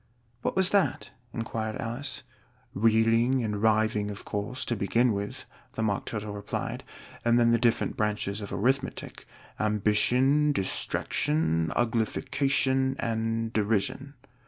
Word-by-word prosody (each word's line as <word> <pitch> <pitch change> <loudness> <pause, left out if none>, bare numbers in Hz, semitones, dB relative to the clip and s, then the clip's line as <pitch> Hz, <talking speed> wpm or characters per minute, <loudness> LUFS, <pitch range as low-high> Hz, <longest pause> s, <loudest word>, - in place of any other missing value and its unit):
"What - - -2
was 190 -1 +3
that?" 200 -2 +1 0.2
inquired 110 -2 -3
Alice. 130 +4 -5 0.5
"Reeling 115 +4 +3
and 105 -2 -2
Writhing, 110 -1 +2
of 105 - -7
course, 105 +6 -3
to 120 - -1
begin 115 +4 +2
with," 105 +6 -5 0.3
the 110 - -2
Mock 100 -3 -1
Turtle 105 -2 -4
replied; 100 0 -4 0.4
"and 120 0 +4
then 115 0 +4
the 115 - +3
different 115 0 +1
branches 105 -1 -1
of 100 - -7
Arithmetic 130 +5 -2 0.3
Ambition, 125 +8 +3
Distraction, 80 - 0
Uglification, 130 +3 +1
and 115 0 -1
Derision." 115 +7 -1
115 Hz, 120 wpm, -28 LUFS, 105-130 Hz, 0.5 s, and